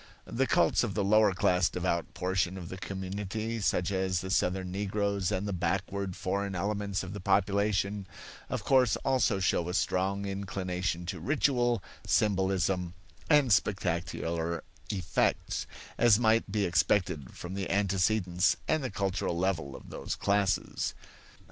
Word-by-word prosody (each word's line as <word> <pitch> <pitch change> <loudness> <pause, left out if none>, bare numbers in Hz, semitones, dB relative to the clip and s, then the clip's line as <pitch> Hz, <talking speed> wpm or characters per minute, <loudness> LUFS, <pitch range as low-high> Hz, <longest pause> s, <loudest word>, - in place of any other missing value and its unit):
The - - 0
cults - - +3
of - - -2
the 100 - +1
lower 105 +1 +5
class 90 0 +2
devout 90 -2 -2
portion 95 0 0
of 90 -2 -7
the 95 - -6
community, 100 +4 -4
such 95 -1 +1
as 95 -2 0
the 95 - -5
Southern 90 -1 0
Negroes 100 0 -1
and 100 +1 -1
the 100 - -2
backward 95 +1 -2
foreign 100 +1 -2
elements 100 +1 -1
of 95 +1 -6
the 100 - -5
population, 100 +1 +1 0.4
of - - -3
course 130 -4 +4
also 125 -6 +2
show 90 -2 +1
a 90 - -2
strong 95 +2 0
inclination 95 -3 -3
to 90 0 -4
ritual, 120 - +1 0.2
symbolism, 95 -4 +1 0.3
and 145 -7 +5
spectacular 85 -4 -1 0.3
effects; 95 -4 0 0.3
as 120 -4 +6
might 110 -3 +2
be 105 -1 +1
expected 85 -5 +1
from 90 +1 -7
the 95 -2 -3
antecedents 95 -1 +2
and 155 -2 +1
the 130 - -2
cultural 100 -3 -1
level 85 -7 -1
of - - -12
those - - -4
classes. 100 -1 0
95 Hz, 140 wpm, -30 LUFS, 90-105 Hz, 0.4 s, as